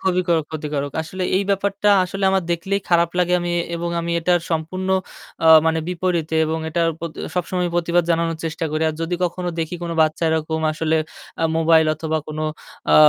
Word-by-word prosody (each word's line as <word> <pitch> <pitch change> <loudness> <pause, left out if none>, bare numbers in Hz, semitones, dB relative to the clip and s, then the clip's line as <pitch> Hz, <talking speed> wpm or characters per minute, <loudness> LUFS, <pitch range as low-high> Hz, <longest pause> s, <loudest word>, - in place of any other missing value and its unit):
খুবই 185 -1 +1
ক্ষ - - -1 0.2
ক্ষতিকারক। 150 -2 -3
আসলে 185 +4 -6
এই 195 - +2
ব্যাপারটা 200 +1 +1
আসলে 195 +2 -3
আমার 190 -1 +2
দেখলেই 195 +4 -1
খারাপ 170 -1 +3
লাগে 180 0 +2
আমি 175 0 -2 0.2
এবং 170 0 -3
আমি 170 0 -2
এটার 175 +1 +2
সম্পূর্ণ 170 +4 -2 0.6
আ - - +4 0.2
মানে 160 0 +2
বিপরীতে 170 -3 -1
এবং 160 +1 -1
এটার 165 +1 +1
প্রতি 165 -1 -6 0.2
সবসময়ই 180 0 -1
প্রতিবাদ 175 0 +2
জানানোর 165 0 +1
চেষ্টা 165 +1 -3
করি। 155 +1 0
আর 155 - -3
যদি 165 +2 -1
কখনো 180 +1 -2
দেখি 160 +2 -3
কোন 170 - -3
বাচ্চা 155 +2 0
এরকম 160 0 -1
আসলে 160 +1 0 0.5
আ - - +3
মোবাইল 160 -1 +4
অথবা 160 +1 -2
কোন 155 0 -6 0.5
আ - - +7
170 Hz, 185 wpm, -21 LUFS, 160-180 Hz, 0.6 s, আ